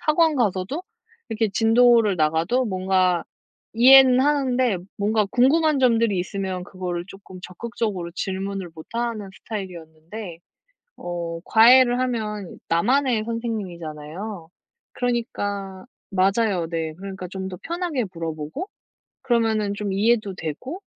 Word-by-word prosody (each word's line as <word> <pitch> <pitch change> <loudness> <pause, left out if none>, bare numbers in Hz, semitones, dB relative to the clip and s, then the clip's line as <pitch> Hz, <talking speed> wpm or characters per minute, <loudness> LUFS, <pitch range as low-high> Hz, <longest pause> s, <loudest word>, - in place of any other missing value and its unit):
학원 315 0 +3
가서도 215 - -1 0.5
이렇게 225 -1 0
진도를 225 -1 +4
나가도 160 +11 +1
뭔가 185 -2 +1 0.5
이해는 255 +2 +7
하는데 260 -7 +1 0.2
뭔가 210 +1 +1
궁금한 290 +5 +3
점들이 230 -5 +3
있으면 185 0 -3
그거를 180 -2 -5
쪼끔 195 -2 -12
적극적으로 200 -2 -4
질문을 190 -1 -4
못 160 -1 -11
하는 230 -4 -2
스타일이었는데. 175 -1 -8 0.6
어 170 -1 -5
과외를 245 +3 +6
하면 215 -6 -3
나만의 235 +6 +2
선생님이잖아요. 185 -5 -5 0.5
그러니까 205 -6 -3 0.2
맞아요 195 -2 +1
네. 165 -2 -3
그러니까 190 +1 -7
좀 190 +1 -5
더 180 - -7
편하게 340 -8 -2
물어보고 165 - -5 0.5
그러면은 220 -4 +1
좀 205 -1 -3
이해도 210 0 +1
되고 220 - -6
205 Hz, 295 characters per minute, -23 LUFS, 180-240 Hz, 0.6 s, 이해는